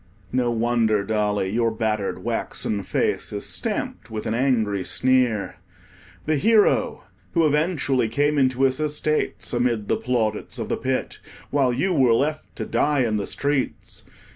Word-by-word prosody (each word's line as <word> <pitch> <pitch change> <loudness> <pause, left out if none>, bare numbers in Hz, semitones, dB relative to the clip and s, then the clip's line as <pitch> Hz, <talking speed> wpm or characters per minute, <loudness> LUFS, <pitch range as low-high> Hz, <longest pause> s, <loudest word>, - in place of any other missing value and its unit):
No 125 -1 +1
wonder, 115 -2 +1
Dolly, 105 -2 0
your 115 +1 +2
battered 110 -3 -2
waxen 105 -2 -2
face 95 - -1
is - - -4
stamped - - -3
with 110 -1 -5
an - - -1
angry 115 -6 +1
sneer. 125 -4 +1 0.7
The 155 0 +1
Hero, 215 +6 +3 0.3
who 165 -2 +3
eventually 150 -5 +1
came 145 +4 +1
into 130 0 +2
his 130 +1 +2
estates 155 -2 -1
amid 120 -4 0
the - - +2
plaudits 115 -1 -2
of 115 -3 -4
the - - 0
Pit, 130 0 -2 0.3
while 135 -3 +2
you 185 +10 0
were 130 -7 +4
left 150 +5 -2
to - - -4
die 145 -2 +1
in 110 -3 +1
the 100 - -3
streets! 140 -1 -2
125 Hz, 150 wpm, -23 LUFS, 110-145 Hz, 0.7 s, were